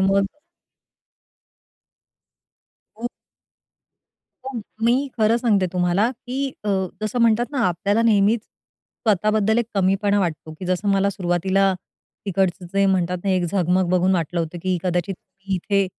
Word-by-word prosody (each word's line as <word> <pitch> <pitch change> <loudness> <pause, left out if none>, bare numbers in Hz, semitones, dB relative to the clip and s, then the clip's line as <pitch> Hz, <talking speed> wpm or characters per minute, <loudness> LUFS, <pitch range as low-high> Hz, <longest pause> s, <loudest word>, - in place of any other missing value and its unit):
मग 195 +1 +3 2.7
हो. 240 - -3 1.4
पण 260 -3 -5 0.2
मी 260 +4 +2
खरं 220 +2 +4
सांगते 215 -6 +2
तुम्हाला, 180 +6 +2
की 260 +2 -4 0.2
अ, 210 - -2 0.3
जसं 215 +3 -2
म्हणतात 230 +1 +3
ना 280 - -2
आपल्याला 200 +6 0
नेहमीच, 215 0 +3
स्वतः 215 -2 -3
बद्दल 215 +1 +2
एक 235 - 0
कमीपणा 200 +1 +2
वाटतो, 160 -3 -3
की 185 - -6
जसं 185 +3 0
मला 195 0 +3
सुरुवातीला 190 +1 +1 0.5
तिकडचं 190 -1 0
जे 195 0 +3
म्हणतात 180 -2 +1
ना 195 - +1
एक 185 -1 +2
झगमग 180 0 +1
बघून 185 +1 +3
वाटलं 170 0 -1
होतं, 165 +1 -4
की 185 -1 0
कदाचित 180 +1 -1 0.4
इथे 195 +2 +1
195 Hz, 130 wpm, -22 LUFS, 180-215 Hz, 2.7 s, खरं